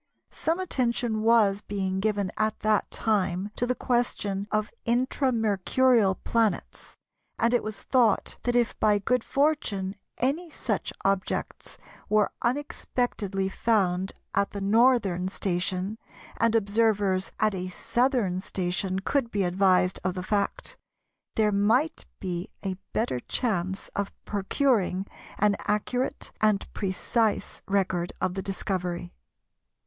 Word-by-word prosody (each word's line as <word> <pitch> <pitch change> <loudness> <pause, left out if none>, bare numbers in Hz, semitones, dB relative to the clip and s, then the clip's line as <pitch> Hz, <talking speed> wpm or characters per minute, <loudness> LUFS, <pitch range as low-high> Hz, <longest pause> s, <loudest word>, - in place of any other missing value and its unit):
Some 330 +3 -1
attention 240 -9 0
was 215 -3 +4
being 190 -2 -2
given 200 -2 0
at 215 0 -1
that 215 -1 +2
time 195 -2 0
to 245 - -1
the 250 - +1
question 205 -6 -1
of 215 0 0
Intra 255 +3 +1
Mercurial 220 0 +3
planets, 225 0 -1 0.4
and 235 +1 +2
it 245 - +3
was 215 -1 -6
thought 240 -5 +2
that 245 0 0
if 240 -2 +2
by 210 -1 +4
good 235 +4 +1
fortune 220 -10 0 0.2
any 305 +8 0
such - - -2
objects 195 0 -1 0.3
were 210 -1 +3
unexpectedly 240 -6 -1
found 190 -3 +1 0.2
at 200 - +2
the 200 - -3
northern 200 -3 +3
station, 185 +2 -2 0.4
and 230 0 +2
observers 205 -3 +2
at 215 -1 +3
a 185 -1 -3
southern 235 -1 +1
station 185 +1 -2
could 265 +3 0
be 205 -3 0
advised 185 0 +3
of 185 0 -1
the 180 - -4
fact, 200 +1 -2 0.6
there 215 -1 +3
might 225 +10 +2
be 180 -1 -4
a 195 -2 -1 0.2
better 220 - 0
chance 190 - -2
of 200 -1 -3
procuring 200 -2 +1 0.3
an 205 0 +3
accurate 230 +5 -1
and 215 -2 +3
precise 205 +2 0
record 185 -3 0
of 180 - 0
the 190 - -3
discovery. 180 -3 -3
205 Hz, 125 wpm, -27 LUFS, 190-235 Hz, 0.6 s, was